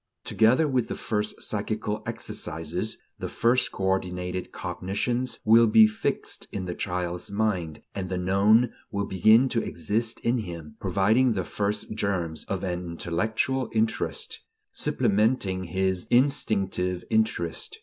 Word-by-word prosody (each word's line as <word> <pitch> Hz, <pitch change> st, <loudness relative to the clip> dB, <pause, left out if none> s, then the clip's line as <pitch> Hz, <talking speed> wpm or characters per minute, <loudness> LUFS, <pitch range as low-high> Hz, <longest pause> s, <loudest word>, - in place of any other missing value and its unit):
Together 125 Hz, +8 st, +3 dB
with 125 Hz, -5 st, +1 dB
the -, -, -4 dB
first 105 Hz, -1 st, -2 dB
psychical 105 Hz, 0 st, -2 dB
exercises, 90 Hz, -4 st, -4 dB, 0.2 s
the -, -, -4 dB
first 125 Hz, +2 st, +2 dB
coordinated 90 Hz, -1 st, -2 dB
cognitions 120 Hz, +7 st, -2 dB
will 115 Hz, +1 st, +7 dB
be 110 Hz, 0 st, +8 dB
fixed 110 Hz, 0 st, -2 dB
in 95 Hz, -2 st, -4 dB
the 90 Hz, -, -3 dB
child's 90 Hz, -1 st, -3 dB
mind, 100 Hz, -7 st, -1 dB
and 95 Hz, -2 st, -4 dB
the 95 Hz, -, -2 dB
known 100 Hz, +6 st, +3 dB, 0.2 s
will 100 Hz, -1 st, -2 dB
begin 110 Hz, +7 st, +5 dB
to 120 Hz, -3 st, 0 dB
exist 105 Hz, +8 st, -2 dB
in 120 Hz, +1 st, +1 dB
him, 85 Hz, -7 st, -7 dB
providing 105 Hz, +7 st, +3 dB
the 95 Hz, -3 st, -1 dB
first 105 Hz, +3 st, -2 dB
germs 90 Hz, -7 st, -2 dB
of 95 Hz, -1 st, -3 dB
an 90 Hz, -1 st, -2 dB
intellectual 110 Hz, +9 st, -1 dB
interest, 110 Hz, -2 st, -1 dB, 0.3 s
supplementing 100 Hz, -3 st, +1 dB
his 95 Hz, +1 st, -1 dB
instinctive 100 Hz, -8 st, +1 dB
interest. 110 Hz, -7 st, 0 dB
100 Hz, 130 wpm, -26 LUFS, 90-110 Hz, 0.3 s, be